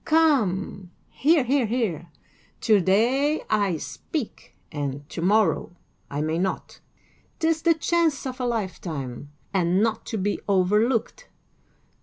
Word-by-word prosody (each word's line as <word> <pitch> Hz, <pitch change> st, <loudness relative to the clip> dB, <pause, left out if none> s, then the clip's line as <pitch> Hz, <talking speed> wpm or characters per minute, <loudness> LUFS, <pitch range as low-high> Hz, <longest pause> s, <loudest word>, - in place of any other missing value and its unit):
Come, 215 Hz, -, +1 dB, 0.2 s
hear, 305 Hz, 0 st, +3 dB
hear, 255 Hz, -1 st, +1 dB
hear! 210 Hz, -8 st, -1 dB, 0.5 s
To 215 Hz, -4 st, +4 dB
day 250 Hz, -, +2 dB
I 200 Hz, -5 st, +2 dB
speak, 180 Hz, -, -6 dB, 0.2 s
and 145 Hz, -1 st, -4 dB
to -, -, -5 dB
morrow 195 Hz, -2 st, +2 dB, 0.3 s
I 145 Hz, +1 st, -3 dB
may 160 Hz, +2 st, -1 dB
not: 190 Hz, +1 st, -3 dB, 0.6 s
'tis 320 Hz, -1 st, +1 dB
the 330 Hz, 0 st, +4 dB
chance 320 Hz, -3 st, +1 dB
of 260 Hz, 0 st, -5 dB
a 250 Hz, -, -1 dB
lifetime, 160 Hz, -, -4 dB, 0.2 s
and 185 Hz, +1 st, +2 dB
not 225 Hz, -1 st, -1 dB
to 225 Hz, -, -3 dB
be 200 Hz, +1 st, -1 dB
overlooked. 210 Hz, -, +1 dB
210 Hz, 125 wpm, -25 LUFS, 180-265 Hz, 0.6 s, To